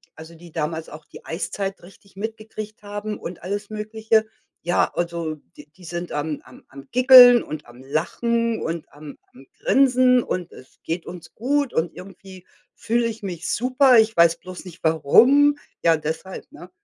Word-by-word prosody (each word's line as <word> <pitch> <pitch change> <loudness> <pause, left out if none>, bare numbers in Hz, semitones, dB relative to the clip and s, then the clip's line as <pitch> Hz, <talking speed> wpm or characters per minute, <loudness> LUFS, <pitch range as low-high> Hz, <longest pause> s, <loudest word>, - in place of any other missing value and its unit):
also, 160 +1 -12
die 170 0 -15
damals 160 +1 -4
auch 150 0 -12
die - - -15
Eiszeit 195 +3 -4
richtig 195 +2 -18
mitgekriegt 215 0 -7
haben 205 +1 -5
und 170 0 -8
alles 205 +3 -4
Mögliche, 220 +1 0 0.3
ja, 175 +1 +1
also, 170 -2 -3 0.2
die 145 0 -13
die 180 0 -17
sind 175 +1 -6
am 150 0 -3
am - - -17
am 135 0 -13
Giggeln 250 -1 +8
und 155 -1 -8
am 120 +1 -16
Lachen 230 - -1
und 165 0 -5
am 145 -1 -11 0.2
am 135 +2 -16
Grinsen 255 -2 +4
und: 180 -2 -4
„Es 130 - -16
geht 165 +1 -4
uns 175 -1 -10
gut 280 +3 -1
und 160 +1 -1
irgendwie 190 -1 -13 0.3
fühle 235 +1 0
ich 220 -2 -7
mich 175 -3 -5
super, 255 +1 +4
ich 220 0 +2
weiß 170 0 +5
bloß 185 0 -10
nicht, 180 -1 -12
warum.“ 245 - +4 0.3
Ja, 165 -1 +5
deshalb, 160 +5 -6
ne, 180 - -13
185 Hz, 170 wpm, -22 LUFS, 165-225 Hz, 0.3 s, Giggeln